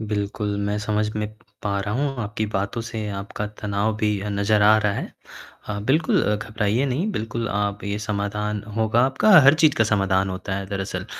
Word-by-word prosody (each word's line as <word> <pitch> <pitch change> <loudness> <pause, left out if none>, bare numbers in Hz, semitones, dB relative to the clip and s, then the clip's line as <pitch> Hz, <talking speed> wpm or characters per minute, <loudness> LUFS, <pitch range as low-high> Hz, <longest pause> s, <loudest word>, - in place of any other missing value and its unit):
बिल्कुल 105 -1 -2
मैं 105 +1 -1
समझ 105 0 0
में 105 0 -2 0.3
पा 100 -1 -1
रहा 105 +1 -3
हूँ, 135 +1 -1
आपकी 105 +1 -3
बातों 100 +4 -1
से 110 -1 -5
आपका 100 +1 -4
तनाव 105 +1 0
भी 105 -1 0
अ, 105 - -4
नज़र 100 +1 +2
आ 105 +1 +7
रहा 105 -1 +1
है। - - -5 0.5
हाँ, 100 -1 -5
बिल्कुल 155 +7 +2
अ, 105 - +2
घबराइए 105 +3 -1
नहीं, 150 +11 -1
बिल्कुल 115 - -3
आप 100 0 -2
ये 100 +1 -2
समाधान 105 0 -2
होगा 110 +1 +2
आपका, 135 +11 +2
हर 140 +1 +7
चीज़ 155 -2 +4
का 110 - +4
समाधान 95 -2 +1
होता 95 +1 -4
है 100 0 -4
दरअसल। 95 0 -4
105 Hz, 195 wpm, -23 LUFS, 100-110 Hz, 0.5 s, आ